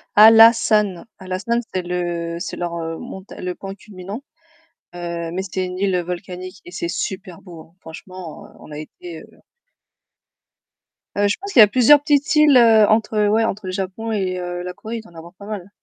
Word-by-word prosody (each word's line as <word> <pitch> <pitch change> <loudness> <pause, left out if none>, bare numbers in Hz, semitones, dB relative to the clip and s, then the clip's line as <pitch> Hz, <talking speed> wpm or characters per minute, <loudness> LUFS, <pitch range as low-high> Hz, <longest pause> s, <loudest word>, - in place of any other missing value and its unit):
Hallasan. 215 -3 +6
Hallasan, 190 +6 -2
c'est 185 - -1
le 175 -1 -3
c'est 175 - -6
leur, 175 -1 -4
heu, 165 -1 -4
monta 190 +3 -10
le 180 0 -3
point 195 0 -8
culminant, 200 +4 -9 0.7
heu, 170 -1 -5
mais 185 +2 -3
c'est 185 -1 -3
une 180 0 -6
île 190 -1 +1
volcanique 180 +1 -7
et 175 - -11
c'est 170 -2 -4
super 185 0 -5
beau 170 -4 -12
hein! 165 +2 -20
Franchement 175 0 -10
heu, - - -20
on - - -14
a 150 - -7
été 160 +2 -10
heu - - -19 1.7
Heu, 205 0 +2
je 200 - +1
pense 400 0 -6
qu'il - - +5
y - - +12
a - - +6
plusieurs 255 +7 +6
petites 290 0 +1
îles, 300 -2 +6
heu, 225 -3 +6
entre, 215 -1 +2
ouais, 220 +2 +2
entre 210 -2 -3
le 185 - -4
Japon 195 +4 -4
et 190 -4 -1
heu, 175 0 -5
la 180 0 -6
Corée, 220 +5 -7
il - - -6
doit 220 - -18
y'en 170 - -16
avoir 170 +2 -12
pas 200 - -13
mal. 200 -3 -7
190 Hz, 200 wpm, -20 LUFS, 175-215 Hz, 1.7 s, y